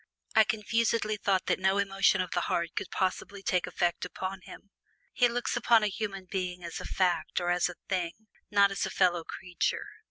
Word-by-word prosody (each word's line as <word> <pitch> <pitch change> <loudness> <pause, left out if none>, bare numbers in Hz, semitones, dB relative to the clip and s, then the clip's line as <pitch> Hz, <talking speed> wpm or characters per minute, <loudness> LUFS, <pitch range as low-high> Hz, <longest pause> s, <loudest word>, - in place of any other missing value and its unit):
I 220 - +7
confusedly 220 0 0
felt 195 -2 +1
that - - +1
no 190 +1 +2
emotion 195 -1 +3
of 180 - -4
the 175 - +1
heart 170 0 0
could - - -3
possibly 195 +1 -2
take 180 -1 +1
effect 175 -1 0
upon 190 0 -5
him. 200 +3 -13 0.4
He 245 - +4
looks 240 0 -2
upon 235 -2 +4
a 210 - +2
human 195 -3 -4
being 180 -1 -4
as 170 -1 -5
a - - -7
fact 185 -1 0
or 175 0 0
as 180 0 +2
a 180 - -8
thing, 180 -3 -1
but 220 0 -33
not 200 -1 +5
as 195 - -2
a - - -4
fellow 175 -3 +2
creature. 180 +1 -2
190 Hz, 200 wpm, -29 LUFS, 180-210 Hz, 0.4 s, I